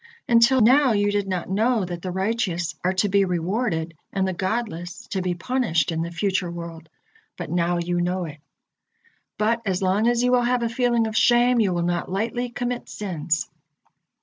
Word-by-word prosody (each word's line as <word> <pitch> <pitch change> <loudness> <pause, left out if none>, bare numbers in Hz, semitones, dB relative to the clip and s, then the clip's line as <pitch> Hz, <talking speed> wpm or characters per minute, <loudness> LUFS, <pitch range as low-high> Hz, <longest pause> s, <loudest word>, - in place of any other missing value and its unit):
Until 240 +2 +5
now 260 +2 +5
you 205 0 +2
did 205 -1 -1
not 185 -2 -2
know 220 +2 +1
that 175 -1 -6
the 185 - -4
righteous 190 -2 -1
are 185 +1 +1
to 185 +2 +1
be 200 +1 +3
rewarded 175 -1 -1 0.2
and 190 -1 0
the 190 - -1
godless 185 -2 -3
to 190 - -2
be 180 -1 -1
punished 175 - 0
in 165 0 -2
the 170 - -3
future 185 0 -1
world, 170 -1 -8 0.5
but - - -6
now 175 0 +1
you 175 0 -1
know 180 +1 -1
it. 155 -2 -9 1.0
But 230 +2 +1
as 190 -3 -1
long 195 +5 +2
as 240 0 +2
you 250 - +3
will 250 -1 +4
have 245 0 +1
a 230 - 0
feeling 240 -1 +1
of 220 -1 -4
shame, 240 +2 +4
you 205 -4 +2
will 175 -1 -1
not 175 +1 -2
lightly 235 +5 -2
commit 245 0 -4
sins." 165 -6 -2
195 Hz, 190 wpm, -23 LUFS, 175-235 Hz, 1.0 s, Until